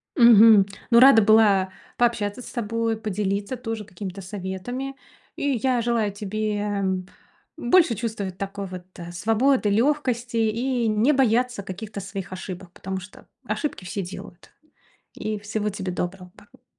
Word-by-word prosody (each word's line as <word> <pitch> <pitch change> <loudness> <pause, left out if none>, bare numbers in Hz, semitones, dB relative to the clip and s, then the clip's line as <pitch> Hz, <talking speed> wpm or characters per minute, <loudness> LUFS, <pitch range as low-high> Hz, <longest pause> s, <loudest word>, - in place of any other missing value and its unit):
Мгм. 225 - +8 0.3
Ну, 235 - +7
рада 260 -3 +8
была 205 -3 +4 0.3
пообщаться 235 -2 0
с - - -10
тобой, 230 -1 -1
поделиться 205 +1 -2
тоже 225 -3 -5
какими-то 190 0 -7
советами. 205 +8 -5 0.4
И 285 - -1
я 255 -2 +2
желаю 230 -3 0
тебе, 210 +1 -3
м, 195 -3 -1 0.5
больше 315 -1 +4
чувствовать 205 -5 -4
такой 195 0 -5
вот, 180 -1 -8
а, 170 0 -8
свободы, 225 +6 +2
лёгкости, 245 0 0
и 230 +2 0
не 215 +7 +3
бояться 250 -3 +2
каких-то 200 +2 -7
своих 195 -1 -6
ошибок, 185 -1 -7
потому 190 0 -5
что 185 +2 -14 0.2
ошибки 240 - -3
все 195 +3 -3
делают. 190 0 -10 0.6
И 215 -1 -3
всего 210 0 -2
тебе 190 -2 -4
доброго, 180 +1 -5
па 205 - -20
210 Hz, 140 wpm, -24 LUFS, 195-235 Hz, 0.6 s, Мгм